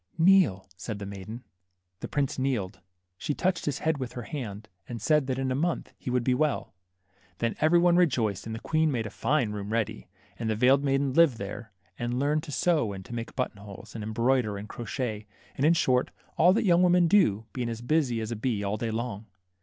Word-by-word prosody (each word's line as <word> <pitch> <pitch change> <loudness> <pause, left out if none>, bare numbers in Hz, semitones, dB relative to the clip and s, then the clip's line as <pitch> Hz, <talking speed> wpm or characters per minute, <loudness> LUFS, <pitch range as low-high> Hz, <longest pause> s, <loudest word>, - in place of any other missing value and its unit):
Kneel," 165 - +4
said 105 +4 -5
the 100 - -6
maiden. 100 +5 -8 0.6
The - - -5
prince 140 -2 -1
kneeled; 105 -8 -1 0.4
she 150 - -2
touched 185 -2 0
his 145 -3 -1
head 160 -2 +1
with 130 -2 -5
her 120 - -6
hand, 110 -7 -6 0.2
and 120 -1 -5
said 150 +4 +2
that 130 -1 -1
in 135 -1 -1
a - - +2
month 165 +6 -1
he - - -7
would 125 -1 +1
be 130 - +2
well. 140 - 0 0.6
Then 115 -1 -1
every 160 +3 +5
one 175 0 +4
rejoiced, 115 - +1
and 110 - -4
the - - -5
queen 155 -1 +1
made 115 -4 -1
a 110 - -6
fine 135 -7 0
room 105 0 -5
ready; 110 -3 -2 0.3
and 115 -1 -2
the 110 - +1
veiled 130 +5 +4
maiden 135 -1 +1
lived 160 -6 +5
there, 105 +2 -7 0.3
and 120 +1 -2
learned 145 +3 +1
to 150 - -7
sew 150 - +1
and 95 -1 -8
to - - -9
make 115 -1 -5
button 130 -5 -2
holes, 100 -1 -11
and 110 - -6
embroider, 115 0 +1
and 100 +2 -7
crotchet, 110 -2 -4 0.3
and, 140 - +2
in 165 - +6
short, 125 -5 +2 0.3
all 175 +3 +6
that 215 - +1
young 175 -2 +5
women 180 -1 +5
do, 155 - +3
being 125 -2 -2
as 115 0 -5
busy 125 -3 +1
as 110 +1 -4
a - - -2
bee 110 -2 -1
all 100 +1 -1
day 115 +1 -2
long. 110 -2 -4
125 Hz, 220 wpm, -28 LUFS, 110-150 Hz, 0.6 s, in